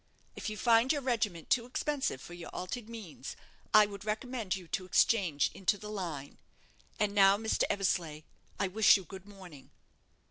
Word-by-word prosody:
If -, -, -4 dB
you 215 Hz, -, -6 dB
find 230 Hz, +4 st, +4 dB
your 290 Hz, -3 st, -1 dB
regiment 210 Hz, -10 st, -1 dB
too 235 Hz, -1 st, +3 dB
expensive 275 Hz, -, -2 dB
for 175 Hz, -, -10 dB
your 175 Hz, -1 st, -8 dB
altered 220 Hz, +5 st, -6 dB
means, 205 Hz, -, -8 dB, 0.4 s
I 215 Hz, 0 st, +8 dB
would 200 Hz, -1 st, -9 dB
recommend 220 Hz, -1 st, -2 dB
you 185 Hz, -3 st, -9 dB
to 185 Hz, -, -2 dB
exchange 180 Hz, -4 st, +2 dB
into 195 Hz, +2 st, 0 dB
the 210 Hz, +1 st, -8 dB
line. 165 Hz, -9 st, -6 dB, 0.6 s
And 210 Hz, -1 st, +1 dB
now, 195 Hz, -1 st, +6 dB
Mr. 220 Hz, +1 st, 0 dB
Eversleigh, 170 Hz, -6 st, -1 dB, 0.4 s
I 200 Hz, -, +1 dB
wish 210 Hz, +3 st, +6 dB
you 195 Hz, -, -8 dB
good 190 Hz, +1 st, -11 dB
morning." 185 Hz, -9 st, -13 dB
200 Hz, 170 wpm, -31 LUFS, 180-220 Hz, 0.6 s, I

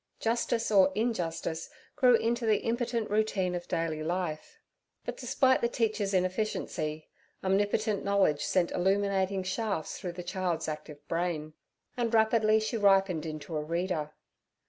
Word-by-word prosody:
Justice 230 Hz, 0 st, 0 dB
or 190 Hz, -2 st, +6 dB
injustice 170 Hz, -8 st, -2 dB, 0.3 s
grew 255 Hz, -4 st, +6 dB
into 230 Hz, +1 st, 0 dB
the 215 Hz, -2 st, +3 dB
impotent 235 Hz, -1 st, -1 dB
routine 205 Hz, -4 st, +1 dB
of 175 Hz, 0 st, -4 dB
daily 165 Hz, -3 st, -1 dB
life. 165 Hz, -1 st, -3 dB, 0.5 s
But, -, -, -4 dB
despite 260 Hz, -2 st, +2 dB
the 235 Hz, -, +2 dB
teacher's 215 Hz, -4 st, 0 dB
inefficiency, 180 Hz, -5 st, -1 dB, 0.4 s
omnipotent 205 Hz, +2 st, +1 dB
knowledge 195 Hz, -7 st, +2 dB
sent 180 Hz, -2 st, +1 dB
illuminating 195 Hz, 0 st, +1 dB
shafts 195 Hz, -3 st, -2 dB
through 180 Hz, -2 st, -5 dB
the 180 Hz, 0 st, -7 dB
child's 180 Hz, -2 st, -2 dB
active 150 Hz, -1 st, -7 dB
brain, 165 Hz, -3 st, -2 dB, 0.4 s
and 235 Hz, -2 st, -1 dB
rapidly 220 Hz, -1 st, +4 dB
she 220 Hz, +2 st, -2 dB
ripened 195 Hz, -5 st, +3 dB
into 155 Hz, 0 st, -6 dB
a 150 Hz, -, 0 dB
reader. 165 Hz, -1 st, -2 dB
190 Hz, 135 wpm, -30 LUFS, 170-220 Hz, 0.5 s, or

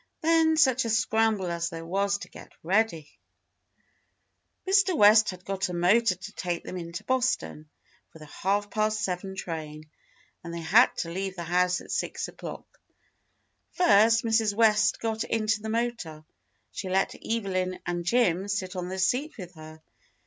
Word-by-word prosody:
Then 320 Hz, 0 st, +3 dB
such 260 Hz, -5 st, +4 dB
a 230 Hz, -, -3 dB
scramble 220 Hz, -3 st, +1 dB
as 170 Hz, 0 st, -2 dB
there 165 Hz, 0 st, -8 dB
was 200 Hz, +3 st, 0 dB
to -, -, -10 dB
get -, -, -14 dB
ready! 180 Hz, -4 st, 0 dB, 1.0 s
' -, -, -46 dB
Mr. 380 Hz, -3 st, +3 dB
West 215 Hz, +1 st, +6 dB
had 180 Hz, -1 st, -8 dB
got 195 Hz, 0 st, -2 dB
a 180 Hz, -, -4 dB
motor 185 Hz, +4 st, +3 dB
to 185 Hz, +3 st, -10 dB
take 175 Hz, -2 st, -4 dB
them -, -, -7 dB
into 170 Hz, -1 st, -6 dB
Boston 250 Hz, -12 st, -1 dB, 0.4 s
for -, -, -14 dB
the 155 Hz, -, -12 dB
half 200 Hz, +6 st, -2 dB
past 215 Hz, -1 st, 0 dB
seven 190 Hz, +1 st, -3 dB
train, 155 Hz, -4 st, -7 dB, 0.5 s
and 170 Hz, -, -7 dB
they 170 Hz, -, -5 dB
had 220 Hz, +9 st, +5 dB
to 165 Hz, -, -3 dB
leave 190 Hz, +1 st, -4 dB
the 170 Hz, -, -5 dB
house 180 Hz, +2 st, +1 dB
at -, -, -10 dB
six -, -, -2 dB
o'clock. -, -, -10 dB, 0.9 s
First 230 Hz, -, +4 dB
Mrs. 220 Hz, -2 st, +1 dB
West 215 Hz, -1 st, +3 dB
got 225 Hz, -1 st, -2 dB
into 215 Hz, -2 st, -1 dB
the 220 Hz, -, -5 dB
motor; 225 Hz, -10 st, -3 dB, 0.5 s
she 200 Hz, -2 st, -6 dB
let 190 Hz, +1 st, +1 dB
Evelyn 185 Hz, -5 st, -2 dB
and 175 Hz, 0 st, -3 dB
Jim 190 Hz, -2 st, +1 dB
sit 195 Hz, -3 st, -3 dB
on 180 Hz, -1 st, -4 dB
the 190 Hz, -, -5 dB
seat 250 Hz, +11 st, 0 dB
with 180 Hz, -3 st, -9 dB
her. 155 Hz, -1 st, -13 dB
195 Hz, 165 wpm, -27 LUFS, 175-225 Hz, 1.0 s, West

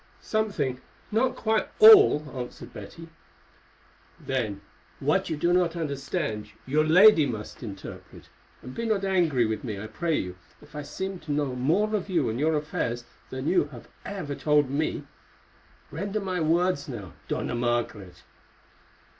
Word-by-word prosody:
"Something, 170 Hz, -, -1 dB, 0.3 s
not 250 Hz, +4 st, +1 dB
quite 220 Hz, -1 st, 0 dB
all," 425 Hz, -, +8 dB
answered 125 Hz, -2 st, -7 dB
Betty. 165 Hz, 0 st, -10 dB, 1.1 s
"Then 115 Hz, -7 st, -3 dB, 0.4 s
what -, -, +1 dB
you 160 Hz, -, -2 dB
do 175 Hz, +3 st, +2 dB
not 180 Hz, -2 st, +2 dB
understand 140 Hz, -, -3 dB, 0.2 s
your 150 Hz, +4 st, +2 dB
lady 165 Hz, 0 st, +7 dB
must 110 Hz, -4 st, -6 dB
interpret, 100 Hz, -5 st, -9 dB, 0.4 s
and 125 Hz, -, -8 dB
be 230 Hz, -, -3 dB
not 210 Hz, -3 st, +1 dB
angry 170 Hz, -10 st, +2 dB
with 110 Hz, 0 st, -3 dB
me, 105 Hz, -6 st, -4 dB
I 105 Hz, -, -6 dB
pray 160 Hz, +9 st, -1 dB
you, 90 Hz, 0 st, -4 dB, 0.2 s
if 145 Hz, 0 st, -17 dB
I 150 Hz, -, -4 dB
seem 190 Hz, +6 st, -5 dB
to 150 Hz, -, -7 dB
know 145 Hz, -3 st, 0 dB
more 175 Hz, +12 st, +1 dB
of 200 Hz, -1 st, -3 dB
you 175 Hz, -11 st, +1 dB
and 115 Hz, -, -4 dB
your 155 Hz, +2 st, +2 dB
affairs 120 Hz, -5 st, -3 dB, 0.2 s
than 130 Hz, +2 st, -5 dB
you 180 Hz, -, +3 dB
have 130 Hz, -5 st, -12 dB, 0.2 s
ever 185 Hz, -8 st, -5 dB
told 150 Hz, -2 st, +2 dB
me. 155 Hz, +3 st, -1 dB, 0.9 s
Render 200 Hz, +6 st, -3 dB
my 185 Hz, -3 st, -2 dB
words 170 Hz, -1 st, +1 dB
now, 105 Hz, -9 st, -7 dB
Dona -, -, -2 dB
Margaret." 120 Hz, -7 st, -2 dB
150 Hz, 150 wpm, -26 LUFS, 125-185 Hz, 1.1 s, all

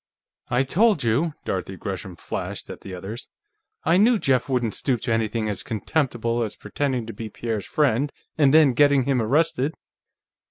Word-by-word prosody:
"I 125 Hz, +2 st, +2 dB
told 195 Hz, -, +3 dB
you," 140 Hz, +8 st, +1 dB
Dorothy 95 Hz, 0 st, -3 dB
Gresham 95 Hz, -2 st, -5 dB
flashed -, -, -5 dB
at -, -, -10 dB
the 95 Hz, -2 st, -7 dB
others. 100 Hz, +6 st, -7 dB, 0.5 s
"I 165 Hz, +3 st, +4 dB
knew 225 Hz, +4 st, +5 dB
Jeff 135 Hz, -, +1 dB
wouldn't 120 Hz, -4 st, 0 dB
stoop 130 Hz, -4 st, 0 dB
to 125 Hz, -, -2 dB
anything 110 Hz, 0 st, 0 dB
as 105 Hz, -3 st, -2 dB
contemptible 120 Hz, 0 st, -1 dB
as 110 Hz, -3 st, -3 dB
pretending 130 Hz, -5 st, -2 dB
to 115 Hz, -, -7 dB
be 110 Hz, +2 st, -6 dB
Pierre's 110 Hz, -2 st, -4 dB
friend 140 Hz, -1 st, +1 dB, 0.2 s
and 145 Hz, -3 st, +4 dB
then 150 Hz, -3 st, +6 dB
getting 145 Hz, +1 st, +4 dB
him 130 Hz, -2 st, +1 dB
arrested!" 150 Hz, +4 st, +1 dB
125 Hz, 165 wpm, -24 LUFS, 110-145 Hz, 0.5 s, then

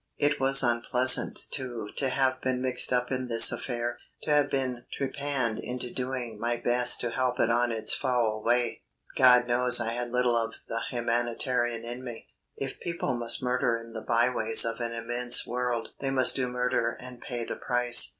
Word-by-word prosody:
It 145 Hz, +1 st, 0 dB
was 135 Hz, +1 st, +7 dB
unpleasant, 125 Hz, +1 st, +4 dB
too, 120 Hz, -6 st, -4 dB
to 135 Hz, -, +1 dB
have 130 Hz, 0 st, -1 dB
been 130 Hz, -1 st, -2 dB
mixed 130 Hz, -1 st, +2 dB
up 125 Hz, 0 st, 0 dB
in 130 Hz, -1 st, -3 dB
this 115 Hz, -1 st, +7 dB
affair, 120 Hz, -1 st, -5 dB, 0.2 s
to -, -, -3 dB
have 145 Hz, -1 st, +2 dB
been 130 Hz, -3 st, -3 dB
trepanned 140 Hz, -4 st, -3 dB
into 125 Hz, 0 st, -6 dB
doing 125 Hz, -4 st, -5 dB
my 120 Hz, +1 st, -2 dB
best 120 Hz, +1 st, +2 dB
to 120 Hz, -, -3 dB
help 125 Hz, +1 st, -2 dB
it 115 Hz, -, +2 dB
on 120 Hz, 0 st, +1 dB
its 110 Hz, -1 st, +2 dB
foul 120 Hz, -5 st, -1 dB
way. 120 Hz, 0 st, 0 dB, 0.3 s
God 125 Hz, -1 st, +5 dB
knows 125 Hz, +1 st, +4 dB
I 115 Hz, -, -1 dB
had 120 Hz, +1 st, -3 dB
little 125 Hz, 0 st, 0 dB
of 115 Hz, -1 st, -2 dB
the 115 Hz, 0 st, -4 dB
humanitarian 120 Hz, 0 st, -2 dB
in 120 Hz, +2 st, -7 dB
me. 120 Hz, -3 st, -10 dB, 0.3 s
If 135 Hz, -1 st, -7 dB
people 170 Hz, -6 st, -4 dB
must 120 Hz, 0 st, -1 dB
murder 125 Hz, -2 st, 0 dB
in 115 Hz, 0 st, -12 dB
the 110 Hz, -, -6 dB
by 120 Hz, +2 st, +1 dB
ways 110 Hz, -2 st, +4 dB
of 115 Hz, +1 st, -3 dB
an 120 Hz, -1 st, -4 dB
immense 120 Hz, +1 st, +1 dB
world 125 Hz, -1 st, -3 dB
they 135 Hz, -, -3 dB
must 130 Hz, -2 st, +2 dB
do 130 Hz, -2 st, 0 dB
murder 125 Hz, -1 st, -2 dB
and 125 Hz, -1 st, -11 dB
pay 120 Hz, -2 st, -6 dB
the -, -, -6 dB
price. 125 Hz, -1 st, +4 dB
125 Hz, 190 wpm, -27 LUFS, 120-130 Hz, 0.3 s, was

